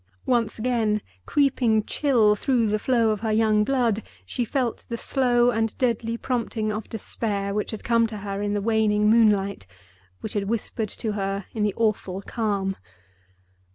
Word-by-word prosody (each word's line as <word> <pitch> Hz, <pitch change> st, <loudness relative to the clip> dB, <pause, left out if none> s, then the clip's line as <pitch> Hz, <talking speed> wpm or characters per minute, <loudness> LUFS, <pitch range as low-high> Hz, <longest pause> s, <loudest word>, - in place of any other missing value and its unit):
Once 235 Hz, -3 st, +1 dB
again, 220 Hz, -2 st, +1 dB, 0.3 s
creeping 250 Hz, -6 st, +2 dB
chill 230 Hz, -8 st, +3 dB
through 240 Hz, +1 st, +1 dB
the 215 Hz, 0 st, 0 dB
flow 230 Hz, -2 st, +2 dB
of 215 Hz, -, -2 dB
her 220 Hz, +1 st, -1 dB
young 215 Hz, -1 st, +3 dB
blood, 235 Hz, -3 st, +1 dB, 0.2 s
she 240 Hz, -, -2 dB
felt 240 Hz, 0 st, -1 dB
the 235 Hz, -, -3 dB
slow 245 Hz, -1 st, +3 dB
and 225 Hz, -1 st, -1 dB
deadly 230 Hz, -2 st, 0 dB
prompting 230 Hz, -3 st, -2 dB
of 215 Hz, 0 st, -5 dB
despair 200 Hz, -2 st, -3 dB
which 210 Hz, 0 st, -2 dB
had 220 Hz, -, -6 dB
come 230 Hz, -1 st, +3 dB
to 215 Hz, -1 st, -7 dB
her 200 Hz, 0 st, -4 dB
in 205 Hz, 0 st, -1 dB
the 205 Hz, -, 0 dB
waning 210 Hz, -1 st, +2 dB
moonlight, 200 Hz, -, +3 dB, 0.5 s
which 215 Hz, -, -5 dB
had 200 Hz, -1 st, -2 dB
whispered 220 Hz, -1 st, -2 dB
to 220 Hz, +2 st, -4 dB
her 195 Hz, -1 st, -2 dB
in 220 Hz, -, -3 dB
the 210 Hz, -1 st, +1 dB
awful 210 Hz, -4 st, 0 dB
calm. 200 Hz, -4 st, -1 dB
220 Hz, 165 wpm, -24 LUFS, 210-235 Hz, 0.5 s, chill